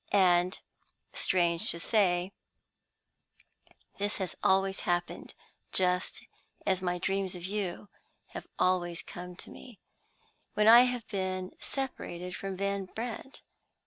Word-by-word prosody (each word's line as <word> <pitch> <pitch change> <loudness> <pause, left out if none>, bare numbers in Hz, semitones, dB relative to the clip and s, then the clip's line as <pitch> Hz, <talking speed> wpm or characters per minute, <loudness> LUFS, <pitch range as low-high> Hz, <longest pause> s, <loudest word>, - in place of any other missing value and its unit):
And, 180 -2 +4 0.5
strange 170 -2 +1
to 170 - -2
say, 180 -2 +2 1.7
this 205 +1 0
has 190 -3 -3
always 195 0 +3
happened 175 0 -2 0.4
(just 180 -1 +1 0.4
as 190 -1 +2
my 180 -1 0
dreams 190 +1 -1
of 175 -1 -6
you 200 -1 -3 0.4
have - - -8
always 175 -2 +1
come 180 0 -8
to - - -11
me) 245 -6 -12 0.8
when 210 0 +4
I 235 +2 +10
have 245 -2 -2
been 185 -2 -2
separated 180 -10 -4
from 195 -1 -4
Van 200 0 -1
Brandt. 235 +7 -6
185 Hz, 115 wpm, -31 LUFS, 180-200 Hz, 1.7 s, I